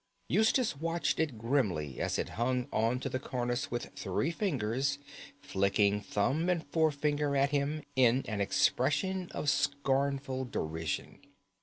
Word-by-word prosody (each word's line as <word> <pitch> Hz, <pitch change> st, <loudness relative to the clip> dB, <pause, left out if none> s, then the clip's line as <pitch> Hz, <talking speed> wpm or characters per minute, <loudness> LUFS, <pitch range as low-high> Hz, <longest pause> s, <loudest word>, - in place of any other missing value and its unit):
Eustace 220 Hz, -, +3 dB
watched 165 Hz, +3 st, -1 dB
it 150 Hz, -7 st, 0 dB
grimly 105 Hz, -, 0 dB
as -, -, 0 dB
it -, -, -2 dB
hung 125 Hz, +2 st, -1 dB
on 115 Hz, +3 st, +1 dB
to 135 Hz, -, -3 dB
the 130 Hz, -1 st, -2 dB
cornice 120 Hz, -2 st, -2 dB
with 120 Hz, 0 st, -4 dB
three 165 Hz, -, -1 dB
fingers, 140 Hz, -, 0 dB, 0.4 s
flicking 100 Hz, +1 st, +1 dB
thumb 135 Hz, -, 0 dB
and 170 Hz, -3 st, 0 dB
forefinger 150 Hz, -2 st, +1 dB
at 140 Hz, +1 st, +3 dB
him 145 Hz, +1 st, 0 dB
in 130 Hz, 0 st, +4 dB
an 105 Hz, -2 st, -2 dB
expression 150 Hz, -, +1 dB
of -, -, -4 dB
scornful 140 Hz, -2 st, +1 dB
derision. 80 Hz, -, -3 dB
135 Hz, 135 wpm, -31 LUFS, 115-150 Hz, 0.4 s, in